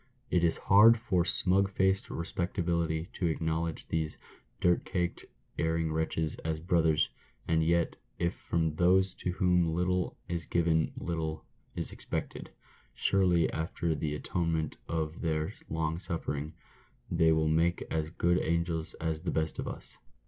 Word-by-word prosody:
It 90 -1 +3
is 85 - +3
hard 110 +4 +7
for 95 -6 +1
smug 95 +2 +2
faced 95 0 +1
respectability 85 -1 -1
to 90 - -1
acknowledge 80 0 -2
these 80 -1 -2 0.4
dirt 90 0 +3
caked, 90 -2 -2 0.3
erring 80 -1 0
wretches 80 0 -1
as 80 -1 -3
brothers, 80 -3 +2 0.4
and 80 -1 +2
yet, 85 +1 +1 0.2
if 85 +1 0
from 80 -2 -1
those 95 +2 +4
to 90 - -3
whom 90 -3 +2
little 90 +1 0
is 85 -2 -3
given 80 -2 +2
little 80 -2 -3 0.3
is - - -4
expected, - - -5 0.5
surely, 90 -4 +5
after 80 +1 -1
the 75 0 -2
atonement 80 0 -1
of 80 -1 -2
their 80 -2 -1 0.2
long 80 +1 -1
suffering, 80 -4 -4 0.6
they 80 -1 +4
will 80 0 +2
make 85 +2 +2
as 80 -1 -1
good 85 +2 +1
angels 85 -1 -1
as 80 -1 -3
the 90 - -3
best 80 -1 -1
of - - -3
us. - - -9
85 Hz, 140 wpm, -30 LUFS, 80-90 Hz, 0.6 s, hard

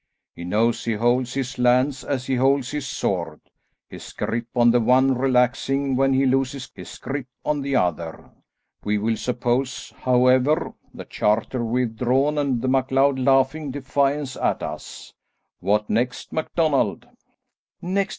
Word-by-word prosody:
He 85 - -9
knows 110 +6 +1
he 115 - -1
holds 120 +3 0
his 135 -1 -3
lands 125 +3 +2
as 130 -3 -3
he 135 - -2
holds 135 0 +2
his 145 -3 -4
sword, 85 -9 -2 0.5
his - - -11
grip 115 +1 -3
on 120 -1 +5
the 120 - +3
one 130 +3 +4
relaxing 130 +2 +1
when 135 +1 +2
he 135 +1 +3
loses 135 0 -1
his - - -10
grip 135 -2 -5 0.2
on 150 -1 0
the 140 0 -2
other. 85 -5 -2 0.5
We 105 +1 0
will 110 +2 0
suppose, 125 +2 -2
however, 130 +3 +2 0.2
the - - -10
charter 115 +4 0
withdrawn 125 +5 0
and 130 -4 -1
the - - 0
MacLeod 135 +1 +2
laughing 135 +3 +2
defiance 140 0 -1
at - - -1
us. - - -8 0.5
What 105 +1 +1
next, 125 +3 -2
MacDonald?" 160 -2 0 0.7
"Next! 190 +2 -1
130 Hz, 140 wpm, -23 LUFS, 120-135 Hz, 0.7 s, on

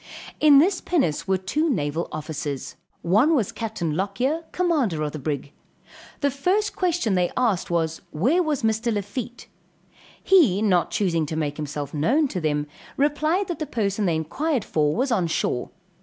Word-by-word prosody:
In 295 -2 +7
this 355 +6 +4
pinnace 270 - 0
were 190 0 +2
two 295 - -1
naval 160 - -1
officers. 150 -2 -5 0.3
One 220 - +4
was 230 -9 0
Capt. 220 -5 -5
Lockyer, 200 - -1
commander 285 - 0
of 150 - -2
the 155 - -6
brig. 140 -1 -4 0.7
The 285 -1 +2
first 370 +10 0
question 345 - 0
they 180 -1 +1
asked 225 -8 +1
was, 165 -1 -1
where 255 - +2
was 305 -7 -1
Mr. 225 +1 +1
Lafitte? 220 +4 -4 0.8
he 290 - +5
not 180 -6 +2
choosing 170 -6 0
to 155 - -4
make 150 -2 -2
himself 145 -2 -5
known 250 - +2
to 185 - -3
them, 150 -2 0 0.3
replied 305 +7 +1
that 345 - -4
the 310 - -3
person 205 -3 -1
they 165 - +1
inquired 245 - -1
for 150 -1 +1
was 260 +3 0
on 185 -7 +2
shore. 125 -6 -1
205 Hz, 165 wpm, -24 LUFS, -, 0.8 s, In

